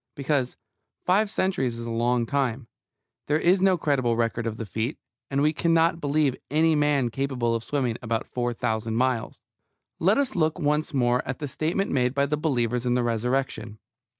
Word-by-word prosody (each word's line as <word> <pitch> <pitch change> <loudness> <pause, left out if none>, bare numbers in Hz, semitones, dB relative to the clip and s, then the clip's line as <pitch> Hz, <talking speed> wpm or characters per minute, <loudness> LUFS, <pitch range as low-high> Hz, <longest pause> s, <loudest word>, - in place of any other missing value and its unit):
Because 140 -2 -1 0.5
five 200 +4 +3
centuries 175 - -1
is 115 - -6
a 115 - -4
long 120 +1 +1
time, 130 -2 -1 0.6
there 150 - +2
is 180 +4 +3
no 190 -1 +4
credible 130 -7 +1
record 115 0 -1
of 110 -1 -4
the 115 - -4
feat, 110 - -3 0.3
and 140 +1 +1
we 155 +1 +3
cannot 165 +1 +2
believe 145 -2 +1
any 160 +3 +3
man 145 -4 +2
capable 125 -1 -1
of 115 -1 -2
swimming 125 -5 -1
about 115 -2 -2
four 120 -1 -2
thousand 110 -1 -2
miles. 125 -1 0 0.6
Let 190 +6 +3
us 275 -2 0
look 160 -1 +1
once 150 -1 0
more 125 -3 +2
at 135 - -3
the 145 - -4
statement 165 +8 -1
made 125 -1 +1
by 140 0 +3
the 150 +2 0
believers 125 -5 0
in 120 - +2
the 125 - +1
Resurrection. 120 -2 -1
135 Hz, 180 wpm, -25 LUFS, 120-155 Hz, 0.6 s, no